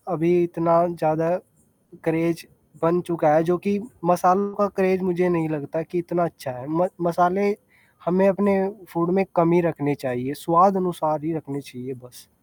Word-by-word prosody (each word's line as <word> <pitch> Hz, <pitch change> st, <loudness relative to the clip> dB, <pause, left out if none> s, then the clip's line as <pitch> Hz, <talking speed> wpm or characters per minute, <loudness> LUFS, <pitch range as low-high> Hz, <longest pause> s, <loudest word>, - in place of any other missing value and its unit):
अभी 165 Hz, +2 st, +1 dB
इतना 170 Hz, 0 st, +2 dB
ज़्यादा 165 Hz, +1 st, 0 dB, 0.7 s
क्रेज़ 165 Hz, +1 st, -1 dB, 0.4 s
बन 170 Hz, +2 st, +3 dB
चुका 165 Hz, -3 st, +2 dB
है, 160 Hz, -, +4 dB
जो 175 Hz, +1 st, +1 dB
कि 200 Hz, +3 st, -2 dB, 0.3 s
मसालों 180 Hz, +3 st, +3 dB
का 205 Hz, 0 st, +2 dB
क्रेज़ 190 Hz, -1 st, +2 dB
मुझे 180 Hz, -1 st, +1 dB
नहीं 165 Hz, -2 st, 0 dB
लगता 155 Hz, +1 st, -4 dB
कि 170 Hz, +3 st, -6 dB
इतना 175 Hz, 0 st, -1 dB
अच्छा 150 Hz, -4 st, -7 dB
है, 125 Hz, +1 st, -11 dB
म 170 Hz, +3 st, +1 dB, 0.2 s
मसाले 180 Hz, +4 st, +2 dB, 0.5 s
हमें 185 Hz, +3 st, +3 dB
अपने 195 Hz, 0 st, +2 dB, 0.3 s
फूड 170 Hz, +1 st, 0 dB
में 195 Hz, 0 st, +2 dB
कम 170 Hz, -1 st, +4 dB
ही 175 Hz, -, +5 dB
रखने 145 Hz, -4 st, -1 dB
चाहिए, 130 Hz, 0 st, -4 dB
स्वादानुसार 170 Hz, -2 st, +2 dB
ही 165 Hz, -, -2 dB
रखने 140 Hz, -1 st, -8 dB
चाहिए 125 Hz, 0 st, -11 dB
बस। 100 Hz, -6 st, -19 dB
170 Hz, 165 wpm, -23 LUFS, 155-180 Hz, 0.7 s, ही